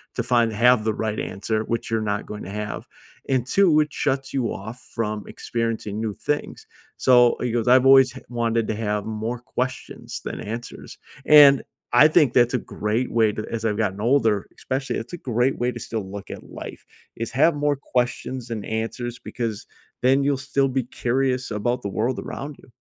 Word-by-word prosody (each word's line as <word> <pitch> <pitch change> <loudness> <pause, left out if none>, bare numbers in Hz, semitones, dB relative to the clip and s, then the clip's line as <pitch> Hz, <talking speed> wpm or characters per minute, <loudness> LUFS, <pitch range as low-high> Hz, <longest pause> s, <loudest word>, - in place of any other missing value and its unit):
to 120 - -1
find 120 -2 +2
have 120 0 +4
the 110 - +1
right 110 0 -2
answer, 110 +3 -2
which 115 0 -3
you're 115 - +2
not 105 -1 -2
going 105 - -7
to 95 - -8
have. 105 +1 -5 0.4
And 130 -2 +1
2, 170 -2 +4
it 150 0 -2
shuts 135 -2 -1
you 125 -4 0
off 110 +6 -8 0.2
from 105 -3 -2
experiencing 115 -3 -3
new 110 -2 -2
things." 150 +7 -3 0.3
So, 125 -2 +5
he 125 -2 -1
goes, 120 0 -1
"I've 130 +1 +6
always 135 -1 +7
hav 130 - -11
wanted 115 -2 0
to 110 - 0
have 105 -1 -1
more 110 +2 -3
questions 130 +1 -5
than - - -5
answers." 115 +3 -7 0.3
And 145 -2 +8 0.3
I 150 +5 +8
think 150 -6 +4
that's 120 0 +4
a - - +1
great 110 +5 -2
way 110 -2 +3
to 110 - -5
as 115 -1 -3
I've 105 -1 0
gotten 100 -3 -1
older, 115 -5 +2
especially, 135 +1 -2
it's 115 +10 -7
a - - -3
great 125 -1 0
way 125 +1 +1
to 120 - -7
still 110 -4 -4
look 100 0 -8
at - - -10
life. - - -9 0.3
Is 115 - -4
have 150 +6 +4
more 145 0 +1
questions 125 -1 -2
than 110 -3 -4
answers 115 +2 -4
because 115 -4 -5 0.4
then 135 +2 +4
you'll 140 -1 +1
still 140 0 0
be 130 -1 0
curious 130 +1 -1
about 120 +4 -1
the 100 - -2
world 115 +6 -1
around 145 +1 -6
you. - - -18
120 Hz, 195 wpm, -23 LUFS, 110-130 Hz, 0.4 s, And